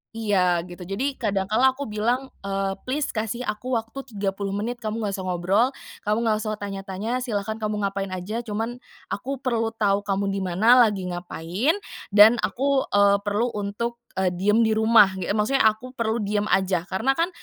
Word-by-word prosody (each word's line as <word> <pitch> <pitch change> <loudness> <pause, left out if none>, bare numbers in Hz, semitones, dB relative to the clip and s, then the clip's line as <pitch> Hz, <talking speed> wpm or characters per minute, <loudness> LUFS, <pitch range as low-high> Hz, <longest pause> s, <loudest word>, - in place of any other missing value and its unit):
Iya, 185 -6 +2
gitu. 175 0 -9
Jadi, 265 +8 -2
kadang 200 -5 0
kala 260 +4 +4
aku 280 - -4
bilang, 240 +5 -1
eee, 195 0 -2
Please 280 +3 -1
kasih 225 +3 -3
aku 245 +3 -2
waktu 225 +3 -4 0.2
30 195 0 -2
menit, 235 +4 -3
kamu 220 0 -3
nggak 205 - -1
usah 190 - -5
ngobrol, 185 +7 +2 0.4
kamu 210 +1 +2
nggak 220 -2 +2
usah 215 0 -2
tanya-tanya, 200 +3 -4
silahkan 220 -3 -3
kamu 210 -1 -2
ngapain 195 0 -1
aja 200 +6 -4
cuman 230 +2 -4 0.3
aku 265 +5 -4
perlu 230 -3 0
tahu 200 -2 +2
kamu 195 0 0
di 195 - -2
mana, 195 +7 +4
lagi 195 -3 -3
ngapain, 175 - -1 0.4
dan 220 +3 +8
aku, 275 +1 0
eee, 200 0 +5
perlu 225 +4 +1
untuk, 215 +4 -3 0.2
eee, 185 -1 +1
diam 210 +6 +2
di 220 - +2
rumah," 220 -3 +5
e 180 - -4
ge - - 0
maksudnya, 220 +3 +3
aku 220 +4 -1
perlu 230 -3 -1
diam 205 +1 0
aja. 190 -3 +1
Karena 190 +8 +1
kan, 330 +5 +1
210 Hz, 185 wpm, -24 LUFS, 195-235 Hz, 0.4 s, dan